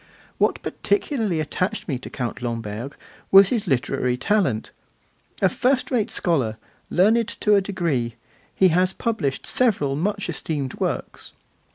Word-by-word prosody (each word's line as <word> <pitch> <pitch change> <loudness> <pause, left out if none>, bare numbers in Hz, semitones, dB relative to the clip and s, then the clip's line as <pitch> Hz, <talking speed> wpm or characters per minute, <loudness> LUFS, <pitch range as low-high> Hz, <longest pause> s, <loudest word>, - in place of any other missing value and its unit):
What - - +1
particularly 225 - -1
attached 185 +7 -2
me 135 -6 -2
to - - -8
Count 125 -1 -4
Lamberg 115 +1 -4 0.3
was 195 0 +8
his 225 -5 -1
literary 125 -3 0
talent. 135 - 0 0.7
A - - +7
first 255 +1 +1
rate 235 -5 +1
scholar, 130 - 0 0.3
learned 220 +5 +3
to 210 - +1
a 200 - +5
degree, 165 - -2 0.4
he 190 - +5
has 180 +2 +2
published 190 - -2
several 190 - +1
much 200 +6 -1
esteemed 150 -5 -3
works. - - -3
175 Hz, 135 wpm, -23 LUFS, 130-210 Hz, 0.7 s, was